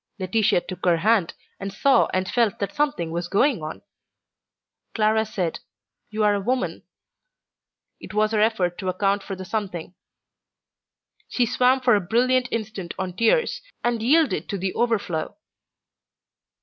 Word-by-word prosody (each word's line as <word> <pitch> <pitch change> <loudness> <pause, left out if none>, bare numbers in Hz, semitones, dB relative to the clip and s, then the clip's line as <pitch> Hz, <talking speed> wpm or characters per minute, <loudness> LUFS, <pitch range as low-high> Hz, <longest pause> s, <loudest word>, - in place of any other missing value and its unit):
Laetitia 190 -1 +1
took 185 0 -9
her 175 -2 +3
hand, 200 0 +2 0.2
and 195 0 -5
saw 270 +7 +3
and 185 0 -1
felt 230 -3 +1
that 200 - -3
something 290 - -1
was 170 +1 -3
going 205 - +2
on. 155 0 -7 1.1
Clara 220 0 +3
said, 180 -6 -2 0.5
"You 215 0 -1
are 210 -1 +4
a 200 - -1
woman." 250 +5 -1 1.2
It - - -10
was 215 0 +2
her 220 - +1
effort 195 -6 +1
to 190 -2 -2
account 195 +2 +1
for 195 - -6
the 185 0 -8
something. 185 -5 -4 1.4
She 245 - +1
swam 255 +3 +2
for 250 -2 +4
a 205 - +1
brilliant 250 +6 +2
instant 215 -6 -4
on 185 -1 -3
tears, 230 - +2 0.2
and 240 -2 0
yielded 300 +5 +2
to 200 - -2
the 190 0 -2
overflow. 220 - -1
210 Hz, 150 wpm, -24 LUFS, 185-235 Hz, 1.4 s, are